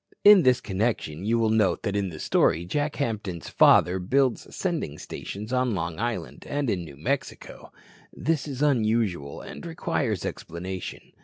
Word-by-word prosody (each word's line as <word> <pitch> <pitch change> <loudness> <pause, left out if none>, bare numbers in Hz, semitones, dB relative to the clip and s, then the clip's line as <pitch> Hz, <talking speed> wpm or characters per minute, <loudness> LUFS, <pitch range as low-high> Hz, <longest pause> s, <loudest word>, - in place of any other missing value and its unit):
In 205 -2 +9
this 125 -4 +3
connection, 95 -5 -2
you 115 +2 +2
will 115 -1 +2
note 110 -3 +2
that 100 -2 -1
in 100 -2 0
the 80 -3 -9
story 80 +2 +2
Jack 145 - -1
Hampton's 105 - -3
father 90 +2 +5
builds 125 +6 +1
sending 165 - -2
stations 105 +8 -7
on 125 -3 +1
Long 85 -1 -3
Island 120 0 -3
and 140 -4 0
in 90 -3 -2
New 75 -4 -11
Mexico. 75 - -4 0.4
This 150 -2 -1
is 140 0 -3
unusual 110 - +1
and - - -9
requires 160 - -2
explanation. 90 +2 -6
110 Hz, 155 wpm, -26 LUFS, 90-130 Hz, 0.4 s, In